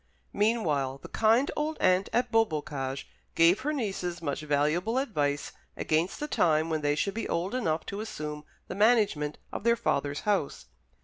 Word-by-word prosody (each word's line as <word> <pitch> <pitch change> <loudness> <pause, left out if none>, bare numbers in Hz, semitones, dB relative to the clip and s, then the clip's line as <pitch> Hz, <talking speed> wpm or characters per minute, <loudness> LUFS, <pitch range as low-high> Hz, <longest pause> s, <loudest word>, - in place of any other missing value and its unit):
Meanwhile 155 - +1
the - - -9
kind 225 +5 +3
old 305 +1 -2
aunt 185 +1 +3
at 245 0 0
Beaubocage 150 - -1 0.3
gave 170 +5 +5
her 290 +3 -1
nieces 195 - -3
much 145 -3 -3
valuable 155 - +1
advice 145 - -1 0.3
against 160 +4 0
the 295 - -3
time 160 - +2
when 155 -1 0
they 145 0 +1
should 195 +6 -1
be 225 - -4
old 180 +5 -1
enough 165 -11 -1
to 200 +1 -5
assume 150 -8 -6 0.2
the - - -5
management 205 -9 +2 0.2
of - - -4
their 235 0 +4
father's 145 -10 -1
house. 200 -8 -1
180 Hz, 165 wpm, -28 LUFS, 150-225 Hz, 0.3 s, gave